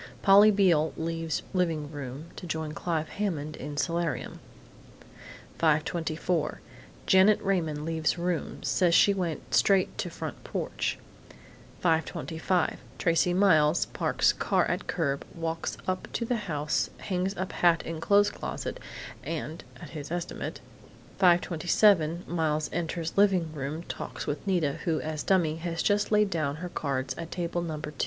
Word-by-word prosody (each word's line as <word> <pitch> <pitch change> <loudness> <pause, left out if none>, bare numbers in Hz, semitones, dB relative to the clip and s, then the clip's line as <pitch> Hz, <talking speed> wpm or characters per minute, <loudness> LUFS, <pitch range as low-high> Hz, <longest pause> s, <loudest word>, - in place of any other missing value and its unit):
Polly 200 +2 +8
Beale 180 -7 +3
leaves 165 -1 -2
living 165 -5 0
room 145 +3 -7
to 180 - -8
join 160 -1 -3
Clive 160 0 -2
Hammond 155 -7 -3
in 145 0 -7
solarium. 165 -2 -2 1.2
5:24 160 0 0 0.5
Janet 190 +2 +6
Raymond 160 -6 -1
leaves 160 0 0
room; 175 -1 -2
says 175 -2 +3
she 200 - +6
went 170 -10 -4
straight 185 +12 +3
to - - -2
front - - -7
porch. - - -2 0.9
5:25 165 +1 0 0.2
Tracey 165 +1 +2
Miles 175 -4 +4
parks - - +1
car - - +1
at - - -2
curb; 140 -5 -1
walks 165 -1 -3
up 185 0 -2
to 235 - -1
the 245 +1 0
house, 150 -1 0
hangs 190 +1 -2
up 185 +1 -3
hat 170 -2 +3
in 165 -1 -5
clothes 205 +3 +4
closet - - -5 0.4
and 160 +2 -5 0.2
at - - -10
(his 150 -3 -7
estimate) 175 +1 -4 0.6
5:27 175 -1 +3
Miles 155 -3 0
enters 170 -1 -3
living 185 -6 +3
room, 150 +3 -4
talks - - -6
with 150 +7 -4
Nita, 170 -7 +1
who, 165 -3 +1
as 155 -1 -3
dummy, 170 -5 +2
has 165 0 -3
just 205 0 +2
laid 210 -2 +3
down 155 -5 -1
her 180 +3 -6
cards 135 -5 -2
at 165 -1 -5
Table 175 0 -2
No. 160 -3 -4
2. 150 - -6
165 Hz, 140 wpm, -28 LUFS, 155-180 Hz, 1.2 s, Polly